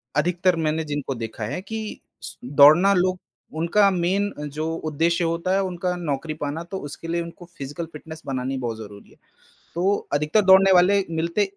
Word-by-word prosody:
अधिकतर 175 +3 +2
मैंने 155 +1 0
जिनको 145 -2 -3
देखा 115 -1 -6
है 150 +12 -4
कि 220 +2 -6 0.2
स - - -8 0.2
दौड़ना 165 +8 +8
लोग 185 0 +1 0.4
उनका 195 +5 +3
मेन 190 +3 0
अ, 150 - -6
जो 155 +3 -3
उद्देश्य 165 +2 0
होता 170 +2 -1
है 195 - +2
उनका 180 -1 -2
नौकरी 155 -2 -3
पाना 145 +3 -3
तो 190 +3 -6
उसके 155 +3 -9
लिए 170 +1 -1
उनको 170 +1 -9
फिजिकल 145 +5 -5
फिटनेस 160 +1 -10
बनानी 135 0 -3
बहुत 120 -3 -3
ज़रूरी 105 -2 -11
है, - - -20 0.6
तो 190 +4 +2 0.2
अधिकतर 150 +8 +2
दौड़ने 190 +1 +7
वाले 190 +2 +5
मिलते 170 +5 0
170 Hz, 175 wpm, -23 LUFS, 145-185 Hz, 0.6 s, दौड़ना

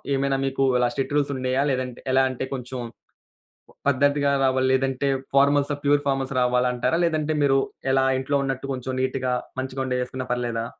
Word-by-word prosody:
ఏమైనా 135 0 0
మీకు 135 0 0 0.2
ఇలా 125 - +3
స్ట్రిక్ట్ 135 +1 -3
రూల్స్ 140 -1 +1
ఉన్నాయా? 130 +1 0
లేదంటే, 125 -1 -3
ఎలా 135 0 +5
అంటే 130 +1 -4
కొంచెం 125 0 -5 1.1
పద్ధతిగా 140 +1 +2
రావాలి 130 0 +2
లేదంటే 135 +1 0 0.3
ఫార్మల్సా, 140 +1 +3
ప్యూర్ 145 0 +3
ఫార్మల్స్ 135 -1 -1
రావాలంటారా? 125 +3 +1
లేదంటే 155 -2 0
మీరు 135 -1 +4 0.3
ఎలా 135 0 +3
ఇంట్లో 135 +2 -1
ఉన్నట్టు 135 0 -3
కొంచెం 130 0 -4
నీట్‌గా 130 -1 -1 0.3
మంచిగా 130 0 -3
ఉండేయేసుకున్నా 125 0 -3
పర్లేదా? 120 -2 -2
130 Hz, 150 wpm, -24 LUFS, 130-140 Hz, 1.1 s, ఎలా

